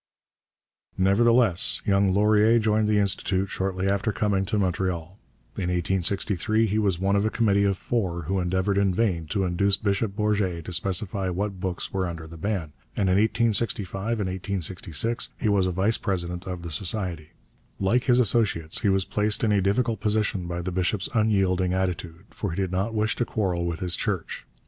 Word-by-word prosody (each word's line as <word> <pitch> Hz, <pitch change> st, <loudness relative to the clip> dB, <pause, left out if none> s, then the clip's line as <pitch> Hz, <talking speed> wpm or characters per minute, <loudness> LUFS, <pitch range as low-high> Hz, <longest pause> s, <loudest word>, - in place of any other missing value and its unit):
Nevertheless 110 Hz, 0 st, +3 dB
young 100 Hz, -2 st, +3 dB
Laurier 105 Hz, +3 st, +4 dB
joined 110 Hz, -1 st, +2 dB
the 105 Hz, 0 st, +2 dB
Institut 95 Hz, -1 st, 0 dB
shortly 95 Hz, 0 st, -2 dB
after 100 Hz, +3 st, +1 dB
coming 100 Hz, -2 st, 0 dB
to 105 Hz, +2 st, -1 dB
Montreal. 90 Hz, -1 st, -2 dB, 0.4 s
In 90 Hz, -2 st, -1 dB
1863 95 Hz, +4 st, +1 dB
he 110 Hz, 0 st, 0 dB
was 100 Hz, -5 st, +1 dB
one 100 Hz, +2 st, +1 dB
of 100 Hz, -, +2 dB
a 110 Hz, -, +1 dB
committee 100 Hz, -3 st, +2 dB
of 100 Hz, -1 st, +1 dB
four 95 Hz, -8 st, -2 dB
who 95 Hz, +5 st, -1 dB
endeavoured 95 Hz, +2 st, 0 dB
in 95 Hz, -2 st, +1 dB
vain 90 Hz, -7 st, 0 dB
to 100 Hz, +3 st, -1 dB
induce 95 Hz, +3 st, +2 dB
Bishop 100 Hz, -1 st, -1 dB
Bourget 100 Hz, -6 st, 0 dB
to 90 Hz, -, -6 dB
specify 95 Hz, +2 st, -2 dB
what 95 Hz, +1 st, -3 dB
books 90 Hz, -1 st, -4 dB
were 95 Hz, -1 st, 0 dB
under 85 Hz, -2 st, -6 dB
the 80 Hz, +1 st, -11 dB
ban, 85 Hz, -3 st, -3 dB, 0.2 s
and 95 Hz, -2 st, +1 dB
in 95 Hz, -, +3 dB
1865 105 Hz, -3 st, +1 dB, 0.2 s
and 95 Hz, -, -1 dB
1866 95 Hz, -, -3 dB
he 115 Hz, -, -1 dB
was 100 Hz, -3 st, +3 dB
a -, -, 0 dB
vice 95 Hz, +5 st, +1 dB
president 90 Hz, -3 st, -3 dB
of 90 Hz, -2 st, -5 dB
the 85 Hz, -, -6 dB
society. 85 Hz, -2 st, -2 dB, 0.5 s
Like 115 Hz, +6 st, +1 dB
his 125 Hz, -1 st, +4 dB
associates, 105 Hz, -9 st, +2 dB
he 105 Hz, -, +2 dB
was 95 Hz, -1 st, +2 dB
placed 105 Hz, +1 st, 0 dB
in 110 Hz, -, +3 dB
a 100 Hz, -1 st, +3 dB
difficult 110 Hz, +3 st, +1 dB
position 105 Hz, -4 st, 0 dB
by 85 Hz, 0 st, -4 dB
the 95 Hz, -, -3 dB
bishop's 95 Hz, +2 st, -1 dB
unyielding 95 Hz, -5 st, +2 dB
attitude, 90 Hz, -1 st, -3 dB
for 100 Hz, -, -4 dB
he 85 Hz, -, -4 dB
did 95 Hz, -1 st, -1 dB
not 100 Hz, +5 st, -1 dB
wish 110 Hz, 0 st, +1 dB
to 120 Hz, -, 0 dB
quarrel 90 Hz, -6 st, -1 dB
with 85 Hz, -2 st, -4 dB
his 90 Hz, -1 st, 0 dB
Church. -, -, -3 dB
95 Hz, 180 wpm, -25 LUFS, 90-105 Hz, 0.5 s, Laurier